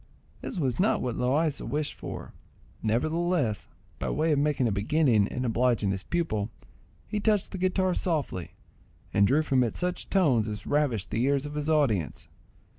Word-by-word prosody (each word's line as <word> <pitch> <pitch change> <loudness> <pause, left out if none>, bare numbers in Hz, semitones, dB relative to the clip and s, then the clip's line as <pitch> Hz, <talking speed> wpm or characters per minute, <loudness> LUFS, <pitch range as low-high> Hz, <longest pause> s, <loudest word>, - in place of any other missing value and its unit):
This - - -5
was 135 -5 0
not 205 +4 +3
what 125 -2 -2
Loaysa 140 +4 0
wished 150 +1 -1
for, - - -8 0.5
nevertheless, 155 - 0 0.3
by - - -2
way 160 +1 +1
of 145 - +3
making 145 -4 +2
a - - 0
beginning 110 +1 +3
and 125 +3 -3
obliging 115 -3 +2
his 95 -1 -2
pupil, 115 - -1 0.6
he 210 - -2
touched 210 -2 +1
the 190 - -5
guitar 185 0 +1
softly, 145 - -2 0.6
and 100 0 +5
drew 150 +6 +3
from 130 -4 +3
it 115 - -2
such 180 0 -2
tones 135 - +3
as 105 -2 -5
ravished 140 -9 0
the 115 - 0
ears 140 +1 +1
of 145 - -6
his 150 +1 -2
audience. 130 - +1
140 Hz, 170 wpm, -28 LUFS, 115-160 Hz, 0.6 s, and